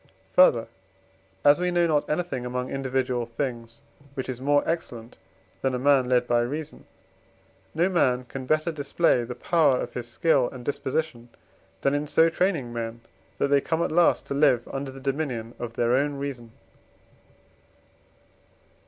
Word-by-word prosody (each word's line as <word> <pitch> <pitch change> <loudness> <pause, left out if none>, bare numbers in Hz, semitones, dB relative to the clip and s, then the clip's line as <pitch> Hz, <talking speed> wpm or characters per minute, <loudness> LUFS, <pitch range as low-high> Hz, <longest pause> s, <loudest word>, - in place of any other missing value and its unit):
Further, 120 -11 +5 0.8
as 145 +3 +6
we 180 0 0
know 175 -1 +2
not 150 -3 +1
anything 150 -5 -2
among 125 +1 -4
individual 130 -3 -1
things 115 -2 -5 0.3
which 130 - -4
is 125 -1 -5
more 145 +1 +3
excellent 120 -9 -4 0.4
than 135 -1 0
a - - 0
man 130 -1 +3
led 125 -1 +3
by 120 -1 +2
reason, 150 +5 -5 0.9
no 170 +3 +3
man 130 -9 +2
can 130 +1 -8
better 155 +3 +1
display 145 -3 +1
the 120 +1 -6
power 155 -7 +2
of 120 - -5
his 120 -1 -5
skill 125 +2 +2
and 125 -2 -10
disposition, 135 -3 -3 0.5
than 140 - +2
in 145 +1 -1
so 165 +2 +4
training 165 -9 0
men, 115 0 -5 0.4
that 140 - 0
they 140 0 +4
come 165 +3 -1
at - - -2
last 170 +2 +3
to - - -4
live 140 -4 +3
under 135 0 -4
the 135 0 -10
dominion 130 -4 -3
of 120 -1 -5
their 120 0 +1
own 140 +2 +1
reason. 135 -5 -6
135 Hz, 160 wpm, -25 LUFS, 120-150 Hz, 0.9 s, as